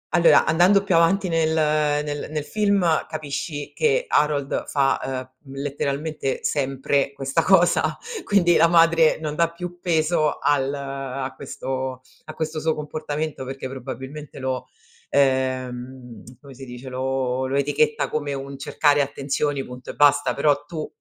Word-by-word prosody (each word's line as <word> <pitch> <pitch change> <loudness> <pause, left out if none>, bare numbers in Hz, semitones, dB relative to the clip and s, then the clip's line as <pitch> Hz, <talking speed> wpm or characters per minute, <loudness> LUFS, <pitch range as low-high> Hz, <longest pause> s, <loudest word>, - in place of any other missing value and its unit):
Allora, 170 -1 +6
andando 185 +5 +4
più 190 - 0
avanti 175 +4 +3
nel 165 -2 +1
nel 150 -1 0
nel 150 -1 -3
film, 200 +2 +1 0.2
capisci 145 -1 -5
che 470 +2 +1
Harold 145 -2 +1
fa, 135 -2 0 0.2
uhm, 135 - -9
letteralmente 140 +1 -3
sempre 135 0 0
questa 135 +4 0
cosa, 175 -1 +3 0.3
quindi 175 -4 +3
la 165 - +6
madre, 165 -1 +4
non 155 -2 -3
dà 170 0 +2
più 175 0 -8
peso 160 -2 +1
al 140 -1 +1
a 135 -1 -5
questo 130 -1 -5 0.2
a 155 - -8
questo 155 -1 -3
suo 160 0 0
comportamento, 150 -1 -4
perché 135 0 -6
probabilmente 135 +3 -8
lo 130 -1 -3 0.4
ehm, 130 -3 -1 0.2
come 140 -2 -13
si 135 +1 -10
dice, 125 +1 -9
lo 130 0 -1
lo 135 - -2
etichetta 145 +2 +1
come 145 -2 -3
un 135 0 -6
cercare 145 +1 +2
attenzioni 140 0 -2
punto 125 0 -10
e - - -4
basta. 145 0 +4
Però 145 0 +2
tu 155 -1 -5
145 Hz, 145 wpm, -23 LUFS, 135-160 Hz, 0.4 s, Allora